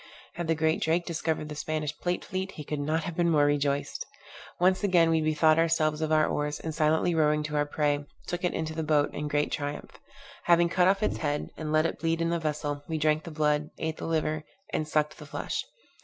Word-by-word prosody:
Had 175 Hz, -1 st, -4 dB
the 165 Hz, -, +2 dB
great 160 Hz, +1 st, +1 dB
Drake 170 Hz, +2 st, +1 dB
discovered 160 Hz, -2 st, -2 dB
the 150 Hz, -, -6 dB
Spanish 150 Hz, -1 st, -3 dB
plate 175 Hz, +2 st, -2 dB
fleet, 190 Hz, +1 st, -4 dB
he 150 Hz, -, -7 dB
could 150 Hz, 0 st, -4 dB
not 155 Hz, +3 st, 0 dB
have 175 Hz, 0 st, -5 dB
been 170 Hz, 0 st, +2 dB
more 150 Hz, -3 st, +4 dB
rejoiced. 145 Hz, -1 st, 0 dB, 0.6 s
Once 185 Hz, +2 st, +3 dB
again 175 Hz, -4 st, +4 dB
we 160 Hz, -1 st, +3 dB
bethought 155 Hz, +1 st, +3 dB
ourselves 160 Hz, -2 st, +2 dB
of 155 Hz, 0 st, -1 dB
our 155 Hz, 0 st, +5 dB
oars, 150 Hz, 0 st, -2 dB
and 160 Hz, -, -4 dB
silently 160 Hz, +3 st, +2 dB
rowing 150 Hz, -1 st, +2 dB
to 150 Hz, 0 st, -4 dB
our 145 Hz, 0 st, +1 dB
prey, 145 Hz, -1 st, 0 dB, 0.2 s
took 175 Hz, +1 st, -4 dB
it 180 Hz, -, 0 dB
into 160 Hz, 0 st, -2 dB
the 160 Hz, -, -2 dB
boat 150 Hz, -2 st, +2 dB
in 150 Hz, -, -3 dB
great 145 Hz, 0 st, 0 dB
triumph. 145 Hz, 0 st, -5 dB, 0.5 s
Having 170 Hz, 0 st, +5 dB
cut 180 Hz, +1 st, +3 dB
off 195 Hz, +2 st, +2 dB
its -, -, 0 dB
head, 145 Hz, -1 st, -2 dB
and 155 Hz, -1 st, -4 dB
let 155 Hz, +1 st, +3 dB
it -, -, -2 dB
bleed 165 Hz, 0 st, 0 dB
in 165 Hz, 0 st, 0 dB
a 170 Hz, -, 0 dB
vessel, 150 Hz, -2 st, -2 dB
we 160 Hz, -, -2 dB
drank 155 Hz, 0 st, +1 dB
the -, -, -6 dB
blood, 150 Hz, -1 st, +1 dB
ate 160 Hz, 0 st, -3 dB
the -, -, -5 dB
liver, 155 Hz, -1 st, 0 dB, 0.3 s
and 155 Hz, -, -1 dB
sucked 155 Hz, 0 st, 0 dB
the 150 Hz, -, -9 dB
flesh. -, -, -3 dB
155 Hz, 230 wpm, -28 LUFS, 150-165 Hz, 0.6 s, our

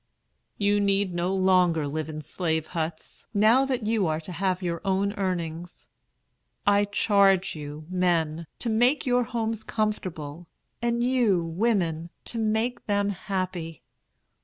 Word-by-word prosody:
"You 205 Hz, 0 st, +2 dB
need 200 Hz, -2 st, +1 dB
no 175 Hz, +2 st, 0 dB
longer 180 Hz, -5 st, +3 dB
live 155 Hz, +2 st, -3 dB
in 155 Hz, 0 st, -5 dB
slave 160 Hz, -1 st, -1 dB
huts, 160 Hz, -1 st, -5 dB
now 225 Hz, +6 st, +5 dB
that 255 Hz, -4 st, -2 dB
you 215 Hz, -4 st, +1 dB
are 155 Hz, 0 st, 0 dB
to 170 Hz, -, -8 dB
have 185 Hz, +1 st, -1 dB
your 170 Hz, -2 st, -2 dB
own 195 Hz, +1 st, +1 dB
earnings. 175 Hz, -4 st, -4 dB, 0.8 s
I 205 Hz, 0 st, +4 dB
charge 200 Hz, -3 st, +3 dB
you, 150 Hz, 0 st, -7 dB
men, 170 Hz, -3 st, 0 dB
to 240 Hz, -, -3 dB
make 245 Hz, +6 st, +3 dB
your 245 Hz, -1 st, +2 dB
homes 225 Hz, -1 st, -2 dB
comfortable, 175 Hz, -7 st, -3 dB, 0.3 s
and 235 Hz, 0 st, +1 dB
you, 240 Hz, -8 st, +2 dB
women, 170 Hz, -3 st, 0 dB, 0.2 s
to 230 Hz, -, -4 dB
make 220 Hz, +3 st, -1 dB
them 205 Hz, -1 st, +1 dB
happy. 185 Hz, -5 st, -4 dB
190 Hz, 135 wpm, -26 LUFS, 165-215 Hz, 0.8 s, now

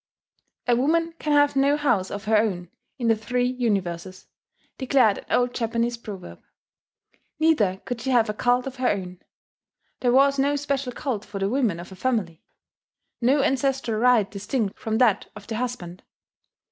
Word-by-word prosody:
"A 240 Hz, -, +4 dB
woman 330 Hz, +6 st, +1 dB
can 300 Hz, -, -2 dB
have 290 Hz, -1 st, +4 dB
no 280 Hz, +2 st, +3 dB
house 240 Hz, -11 st, +1 dB
of 205 Hz, 0 st, -6 dB
her 220 Hz, +1 st, +2 dB
own 185 Hz, -5 st, 0 dB, 0.3 s
in 240 Hz, -3 st, -2 dB
the 225 Hz, -, +4 dB
Three 245 Hz, +3 st, -1 dB
Universes," 195 Hz, -8 st, -2 dB, 0.5 s
declared 255 Hz, -6 st, +3 dB
an -, -, -13 dB
old 245 Hz, 0 st, +1 dB
Japanese 235 Hz, 0 st, -1 dB
proverb. 210 Hz, -6 st, -9 dB, 1.0 s
Neither 225 Hz, -, +2 dB
could 245 Hz, -2 st, -4 dB
she 265 Hz, -, -3 dB
have 240 Hz, -3 st, +3 dB
a 210 Hz, -, -2 dB
cult 245 Hz, +3 st, +1 dB
of 265 Hz, -1 st, -6 dB
her 255 Hz, -1 st, +1 dB
own: 185 Hz, -3 st, -3 dB, 0.8 s
there 245 Hz, -, +2 dB
was 275 Hz, +2 st, +4 dB
no 285 Hz, +2 st, +2 dB
special 280 Hz, -2 st, -2 dB
cult 245 Hz, -5 st, -3 dB
for 205 Hz, -, -8 dB
the 195 Hz, 0 st, 0 dB
women 235 Hz, -8 st, 0 dB
of 175 Hz, +2 st, -10 dB
a -, -, -9 dB
family 190 Hz, -7 st, -2 dB, 0.8 s
no 270 Hz, +4 st, +3 dB
ancestral 270 Hz, -5 st, 0 dB
rite 245 Hz, -5 st, +4 dB
distinct 210 Hz, +1 st, -3 dB
from 220 Hz, 0 st, -1 dB
that 230 Hz, -5 st, +2 dB
of 210 Hz, -1 st, -11 dB
the 220 Hz, 0 st, -4 dB
husband. 220 Hz, -8 st, -5 dB
240 Hz, 170 wpm, -24 LUFS, 205-265 Hz, 1.0 s, A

